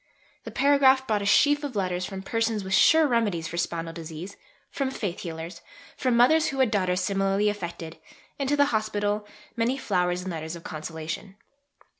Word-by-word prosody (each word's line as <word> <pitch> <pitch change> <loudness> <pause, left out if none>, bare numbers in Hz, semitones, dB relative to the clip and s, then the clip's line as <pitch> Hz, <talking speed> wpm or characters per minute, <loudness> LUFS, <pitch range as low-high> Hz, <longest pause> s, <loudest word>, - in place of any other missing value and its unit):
The - - -5
paragraph 270 -1 +4
brought 215 -5 0
a 200 - -2
sheaf 290 +7 +4
of 280 -5 -5
letters 185 -2 -1
from 190 -1 -7
persons 225 0 -1
with 190 0 -4
"sure 320 +10 +6
remedies" 210 - 0
for 170 - -6
spinal 165 -1 -2
disease, 165 +3 -8 0.4
from 275 -2 -1
faith 200 -9 -4
healers, 165 +1 -7 0.3
from 255 -3 +1
mothers 310 +6 +5
who 270 - -3
had 260 -5 +3
daughters 185 -3 +1
similarly 195 +1 +1
affected; 170 -5 -6 0.4
and 275 -1 -1
to 290 - +2
the 285 - +5
Hospital, 210 -1 -1 0.3
many 240 +3 0
flowers 180 -6 0
and 190 - -4
letters 160 0 -5
of 170 - -11
consolation. 160 +4 -6
200 Hz, 175 wpm, -26 LUFS, 175-245 Hz, 0.4 s, sure